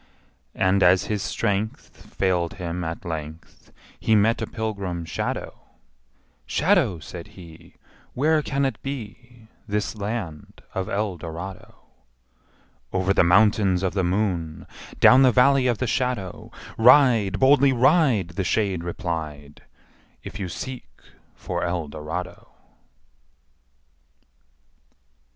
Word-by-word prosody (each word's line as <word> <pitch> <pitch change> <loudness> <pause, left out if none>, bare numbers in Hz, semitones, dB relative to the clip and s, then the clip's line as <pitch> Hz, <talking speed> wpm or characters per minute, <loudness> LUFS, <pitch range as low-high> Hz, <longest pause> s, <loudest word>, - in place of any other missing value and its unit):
And, 95 +1 +2
as 90 +1 +5
his 105 -2 -3
strength 105 0 -3
Failed 90 -3 0
him 90 -1 -4
at 85 +4 -5
length, 80 -1 -8 0.3
He 110 - +2
met 110 +2 +2
a - - -2
pilgrim 100 -7 -4
shadow: 80 - -4 0.9
``Shadow,'' 135 - +1
says 85 0 -8
he, 85 -4 -15 0.4
``Where 155 +3 +2
can 140 -1 -1
it 135 - -3
be, 120 -3 -8 0.2
This 105 +1 -2
land 100 -7 -6
of 95 +2 -3
Eldorado?'' 95 -3 -5 1.1
Over 95 +1 +1
the - - +4
Mountains 95 0 +3
Of 95 - 0
the 95 -1 0
Moon, 90 -4 -2 0.3
Down 130 +1 +7
the 130 -2 +6
Valley 130 +2 +4
of 120 -3 +1
the 130 - -2
Shadow, 120 -6 -2 0.3
Ride, 120 -6 +5
boldly 140 +1 +5
ride,'' 130 - +3
The 90 +2 -3
shade 95 -3 0
replied, 80 -6 -5 0.6
``If 105 - -8
you 95 -3 -4
seek 125 - -7 0.5
for - - -4
Eldorado!'' 80 0 -5
100 Hz, 110 wpm, -24 LUFS, 85-120 Hz, 1.1 s, Down